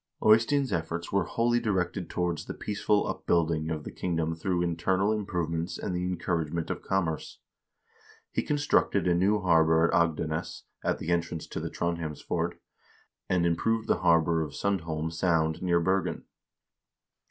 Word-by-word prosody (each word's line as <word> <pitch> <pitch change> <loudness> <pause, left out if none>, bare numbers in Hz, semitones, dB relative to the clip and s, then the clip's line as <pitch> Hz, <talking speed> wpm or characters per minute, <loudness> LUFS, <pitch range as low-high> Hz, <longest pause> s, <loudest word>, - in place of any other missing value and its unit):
Eystein's 115 +3 +4
efforts 85 0 -3
were 100 - +2
wholly 120 +1 +1
directed 95 -6 -1
towards 90 -2 -2
the - - -6
peaceful 105 0 0
upbuilding 80 -2 0
of 80 -2 -3
the - - -7
kingdom 80 -2 -1
through 85 +2 -1
internal 95 +4 +1
improvements 85 -5 -2
and 95 - -3
the 90 - -1
encouragement 85 -3 -2
of - - -4
commerce. 85 -5 -2 0.9
He - - 0
constructed 145 -9 +1
a 90 - +4
new 100 +4 +2
harbor 80 -2 +4
at - - -2
Agdenes, 80 -2 0 0.2
at - - +1
the 85 - -3
entrance 85 -1 -1
to - - -4
the - - -4
Trondhjemsfjord, 85 -3 -2 0.8
and 90 -2 +2
improved 110 +7 +1
the - - +2
harbor 85 -1 +3
of 75 -3 -4
Sundholm 80 -5 -2
Sound 80 -2 +1
near 85 -2 +2
Bergen. 95 +3 0
85 Hz, 145 wpm, -28 LUFS, 80-95 Hz, 0.9 s, Eystein's